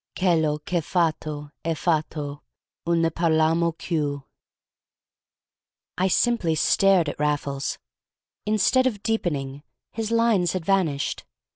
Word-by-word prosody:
Chello 160 -5 +2
ch' - - -8
è - - +1
fatto, 155 -3 -2
è 165 0 -1
fatto, 150 -3 -2 0.5
un 170 -1 +2
ne 165 - +2
parlammo 165 0 +2
cchieù!" 150 -4 -3 1.8
I 185 - +3
simply 190 -5 +2
stared 190 0 +3
at - - -5
Raffles. 145 -2 -1 0.7
Instead 215 +5 +3
of 210 -5 -4
deepening, 145 -11 -2 0.3
his 225 -1 -3
lines 230 -7 +2
had 185 -3 -3
vanished. 170 -8 0
165 Hz, 115 wpm, -24 LUFS, 150-190 Hz, 1.8 s, I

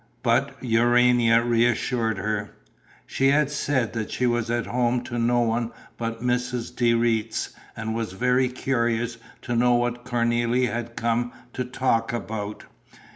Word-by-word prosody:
But 130 +3 +1
Urania 120 -1 +4
reassured 120 -1 +1
her: 105 0 -3 0.5
she 135 - +1
had 145 +1 +3
said 135 -5 0
that 110 -2 -3
she 125 - -1
was 120 -1 0
at 120 0 0
home 120 0 0
to 120 -1 -4
no 120 +1 +2
one 115 0 0 0.3
but 115 0 -4
Mrs. 125 -1 -1
de 120 -1 +3
Retz 115 -1 0 0.3
and 110 0 -3
was 115 -4 -3
very 125 +4 +2
curious 120 -2 -1 0.2
to 120 - -2
know 120 +1 +4
what 120 0 -1
Cornélie 120 -1 +1
had 120 0 -4
come 120 +1 0 0.2
to 125 - -2
talk 125 -2 0
about. 105 -2 -5
120 Hz, 145 wpm, -25 LUFS, 115-125 Hz, 0.5 s, Urania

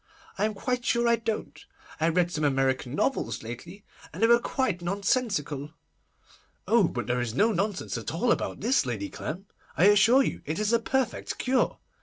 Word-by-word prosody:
I 200 - 0
am 215 -1 -2
quite 250 +4 -2
sure 235 0 +1
I 235 - +5
don't. 225 -1 -4 0.4
I 160 +1 +2
read 175 +1 +1
some 155 -3 -2
American 135 -2 0
novels 270 - -1
lately, 165 - -9 0.3
and 180 +8 -4
they - - +8
were 235 +1 +6
quite 235 -7 -1
nonsensical.' 180 - -1 0.9
'Oh, 225 -6 +4
but 120 -5 -4
there 125 0 0
is 120 -1 -3
no 220 +9 +3
nonsense 195 - -2
at 110 - -5
all 230 +9 +1
about - - -1
this, 245 +6 +2
Lady 110 -6 -4
Clem! 180 +6 -6 0.3
I - - +3
assure 225 +7 +6
you - - -3
it 155 +2 -3
is 215 +2 0
a 235 - +4
perfect 260 +2 -2
cure. 255 0 +1
195 Hz, 185 wpm, -27 LUFS, 150-235 Hz, 0.9 s, they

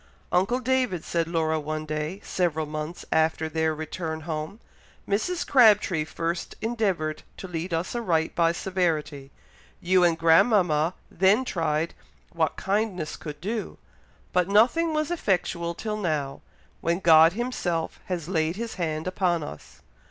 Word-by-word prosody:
"Uncle 195 +8 +2
David," 255 -8 0
said 165 -1 -1
Laura 160 -2 0
one 155 +1 -4
day, 155 +4 -3
several 165 -4 -1
months 155 +2 -6
after 160 0 +2
their 160 0 0
return 160 +1 -5
home, 155 +5 -5 0.5
"Mrs. 335 - -1
Crabtree 210 - +4
first 165 +2 -3
endeavoured 195 -9 -1 0.2
to 190 - -7
lead 175 +1 -4
us 165 +2 -2
aright 170 -9 0
by 165 -1 +3
severity, 165 -6 -2 0.5
you 180 +1 +3
and 170 -2 +3
grandmama 165 -1 +4 0.2
then 195 +8 +3
tried 165 -4 -1 0.4
what 160 -3 0
kindness 195 -5 -1
could 150 -2 -8
do, 215 +5 -4 0.6
but 180 -1 +2
nothing 245 +12 +4
was 305 +2 0
effectual 175 - -1
till 215 +2 -3
now, 155 -8 -2 0.4
when 170 +2 0
God 165 -2 +7
Himself 195 -8 -2
has 175 -4 -4
laid 165 -2 0
His 230 +2 -4
hand 155 -1 -2
upon 180 -3 0
us. 75 - -10
170 Hz, 135 wpm, -26 LUFS, 160-200 Hz, 0.6 s, God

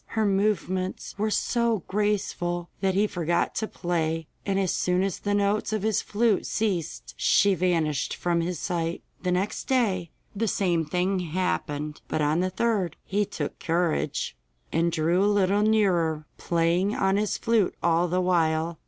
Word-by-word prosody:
Her 220 - +3
movements 190 -2 0
were 215 +1 +1
so 230 -2 +1
graceful 185 -4 -1
that 190 -1 +1
he 205 +2 +4
forgot 170 -3 0
to 220 - -2
play, 165 -3 -2 0.2
and 195 -1 +1
as 190 -3 +1
soon 180 +1 +1
as 195 -3 -2
the 205 0 0
notes 205 +1 +1
of 215 -2 -1
his 220 -2 +1
flute 215 -1 +1
ceased 195 -7 -2
she 200 0 +4
vanished 165 -6 0
from 170 -1 0
his 175 +1 -2
sight. 170 -1 -2 0.2
The 180 - -1
next 190 +4 -1
day 200 -10 +1 0.3
the 225 +3 0
same 175 -5 +1
thing 180 +5 0
happened, 155 -4 -2
but - - -2
on 150 +2 +2
the 185 +1 +1
third 200 -4 0
he 205 +1 0
took 200 - -5
courage, 170 - -1 0.4
and 170 +1 +2
drew 170 +3 +2
a - - +3
little 205 0 +3
nearer, 180 -8 +2
playing 170 +4 +1
on 195 0 +2
his 210 0 0
flute 225 -5 +1
all 170 +1 +3
the 180 +2 0
while. 165 -2 +1
185 Hz, 160 wpm, -26 LUFS, 170-205 Hz, 0.4 s, he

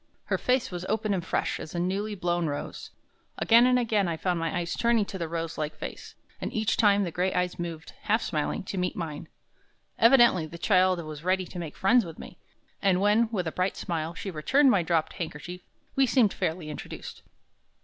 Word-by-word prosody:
Her - - -1
face 255 -3 +1
was 175 -1 -5
open 215 0 0
and 180 -3 -1
fresh - - -1
as 155 - -8
a - - -1
newly 200 +4 -1
blown 175 -2 0
rose. 145 -1 -5 0.5
Again 235 +2 +5
and 250 0 +4
again 215 -5 +1
I 165 -1 -2
found 180 0 -1
my 165 +1 -1
eyes 170 -1 -2
turning 235 -3 +2
to 190 - -7
the 165 - -2
rose 165 0 -4
like 155 0 -3
face, - - -8 0.3
and - - -3
each 220 -1 0
time 205 -2 +4
the 175 - -3
gray 180 +3 0
eyes 180 0 -1
moved, 170 -1 -6
half 220 +2 +1
smiling, 150 +3 -2
to 190 0 -4
meet 180 +4 -1
mine. 160 -4 -5 0.7
Evidently 230 -8 +6
the 170 - -9
child 185 -1 +3
was 155 0 -8
ready 185 +1 +1
to 180 - -8
make 160 -3 -7
friends 230 +5 +4
with 165 -3 -9
me. - - -11 0.4
And 190 -3 +3
when, 210 +3 +3
with 185 -6 -1
a 160 - -2
bright 185 +3 -1
smile, 165 -1 -3
she 195 - -5
returned 265 - +3
my 195 - +3
dropped 165 -1 0
handkerchief, 175 +2 -6 0.3
we 270 -1 +4
seemed 230 -5 +3
fairly 160 -1 -3
introduced. - - -8
180 Hz, 205 wpm, -27 LUFS, 165-210 Hz, 0.7 s, Evidently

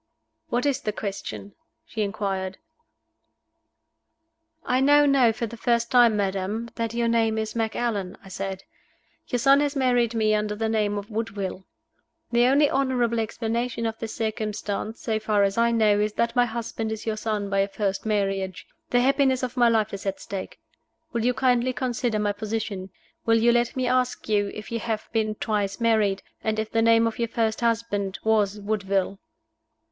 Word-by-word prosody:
"What 245 0 0
is 280 -1 +1
the 210 - -1
question?" 200 0 -6 0.3
she 225 -9 -4
inquired. 195 -2 -2 2.1
"I 255 - +2
now 290 +2 +5
know 270 -5 +5
for 235 +1 -3
the 230 - -8
first 235 0 0
time, 240 -4 +5
madam, 200 +3 -2
that 230 -1 -3
your 235 0 +1
name 225 -1 +2
is 220 0 -3
Macallan," 225 -4 -2
I - - -13
said. 190 0 -5 0.6
"Your 250 - 0
son 275 +3 +5
has 290 0 0
married 245 -3 +2
me 215 -1 +2
under 210 0 0
the 220 +1 -1
name 210 -2 +1
of 205 +2 -6
Woodville. 205 -4 -4 0.7
The 240 +1 +4
only 285 +3 +5
honorable 255 -4 +1
explanation 230 +1 -2
of 225 0 -3
this 225 -1 -5
circumstance, 215 0 -3
so 220 -2 -1
far 210 -2 +2
as 195 0 +1
I 235 0 +3
know, 215 -3 +3
is 210 0 0
that 235 +2 0
my 245 -1 +5
husband 225 -1 -4
is 220 -1 -5
your 220 -1 -1
son 215 -2 -2
by 195 - +2
a 195 - +3
first 200 -1 -2
marriage. 195 -3 -1 0.2
The 245 - +3
happiness 265 0 +2
of 250 0 -3
my 240 -2 +5
life 220 -2 +1
is 200 0 -5
at 195 - -2
stake. 195 -1 -6 0.5
Will 230 -1 0
you 250 +1 +2
kindly 250 +1 +2
consider 245 -3 -1
my 210 -1 +1
position? 205 -2 -4 0.4
Will 225 0 +5
you 235 +1 +4
let 240 0 +1
me 260 -1 0
ask 250 0 0
you 205 -2 +1
if 215 +1 -8
you 230 - -1
have 220 -1 -3
been 215 -1 0
twice 205 -1 -1
married, 215 -4 +2 0.2
and 220 -1 0
if 220 0 -2
the 225 - +2
name 230 0 +5
of 230 0 -2
your 235 - +1
first 225 -1 -1
husband 225 -4 0
was 210 -2 +2
Woodville?" 200 -2 -1
220 Hz, 180 wpm, -25 LUFS, 205-235 Hz, 2.1 s, now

